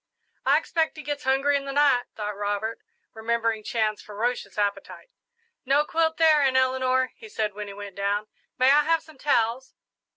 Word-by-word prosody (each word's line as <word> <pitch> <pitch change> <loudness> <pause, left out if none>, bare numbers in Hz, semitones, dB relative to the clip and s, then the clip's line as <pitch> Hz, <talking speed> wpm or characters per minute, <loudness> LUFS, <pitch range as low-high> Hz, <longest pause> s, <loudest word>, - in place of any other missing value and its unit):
"I - - +6
expect 320 -1 -1
he 305 - -8
gets 290 0 -4
hungry 270 +2 +2
in 280 0 -1
the 275 - -4
night," 280 -3 +3
thought 210 -1 -4
Robert, 205 +2 -2 0.3
remembering 225 -1 -1
Chan's 215 -1 -1
ferocious 215 -1 -3
appetite. 205 - -3 0.5
"No 280 +3 +2
quilt 320 0 0
there, 315 -2 +5
Aunt 265 -2 +3
Eleanor," 260 0 +2
he 445 - -12
said, 215 - -2
when 210 +1 -6
he 200 - -8
went 200 -1 -9
down. 200 +1 0 0.3
"May 260 +1 +5
I 295 +1 +6
have 330 +1 +1
some 315 -4 -17
towels?" 250 -2 0
255 Hz, 175 wpm, -25 LUFS, 215-285 Hz, 0.5 s, I